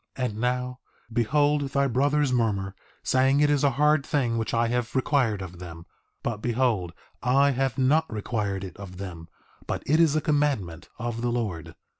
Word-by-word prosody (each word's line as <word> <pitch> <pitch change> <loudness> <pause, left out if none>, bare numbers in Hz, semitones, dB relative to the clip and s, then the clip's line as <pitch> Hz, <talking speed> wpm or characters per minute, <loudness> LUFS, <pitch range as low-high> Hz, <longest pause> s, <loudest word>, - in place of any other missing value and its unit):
3:5 125 - -1
And 110 -4 -4
now, 125 +1 -1 0.3
behold 145 +6 +2
thy 140 +1 +1
brothers 140 +2 +2
murmur, 100 -5 0 0.3
saying 135 +2 +3
it 145 0 +4
is 145 -1 +2
a 140 - +5
hard 150 0 +4
thing 130 -6 0
which 110 - -2
I 115 0 +2
have 120 +1 -2
required 125 -7 +1
of 90 -1 -9
them; 85 -2 -9 0.4
but 115 -3 -2
behold 115 -6 0 0.3
I 135 +3 +4
have 135 -2 -1
not 150 +5 +2
required 105 -3 -2
it 95 - -8
of 95 -2 -9
them, 85 -4 -7 0.4
but - - -3
it 155 +3 +3
is 160 -3 +4
a - - +3
commandment 140 - -1
of 120 -1 -4
the 120 0 0
Lord. 105 -9 -3
125 Hz, 180 wpm, -26 LUFS, 105-140 Hz, 0.4 s, a